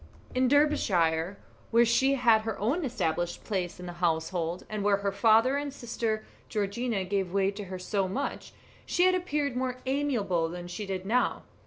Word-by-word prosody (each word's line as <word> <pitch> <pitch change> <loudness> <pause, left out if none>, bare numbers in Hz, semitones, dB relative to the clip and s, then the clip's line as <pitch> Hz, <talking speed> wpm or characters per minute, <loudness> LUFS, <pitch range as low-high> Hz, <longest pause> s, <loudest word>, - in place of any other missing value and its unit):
In 255 0 +2
Derbyshire, 195 - +2 0.3
where 235 +1 +5
she 265 +4 +3
had 235 -4 +4
her 220 -1 -4
own 275 - 0
established 175 - -2
place 180 -4 -3
in 180 - -7
the 175 - -6
household, 165 +1 -1
and 215 -1 -3
where 205 -1 +3
her 200 0 -1
father 225 +6 +4
and 285 0 -3
her 275 - -14
sister 225 -2 -2 0.2
Georgiana 210 0 -1
gave 190 -1 -1
way 195 0 +2
to 205 0 -7
her 185 0 -6
so 190 +1 -1
much, 245 +10 -4 0.3
she 355 - +1
had 370 0 +5
appeared 300 -7 -1
more 255 0 -1
amiable 235 - 0
than 175 +1 -7
she 200 +3 -5
did 190 -1 -4
now. 240 +5 +1
210 Hz, 180 wpm, -29 LUFS, 185-255 Hz, 0.3 s, where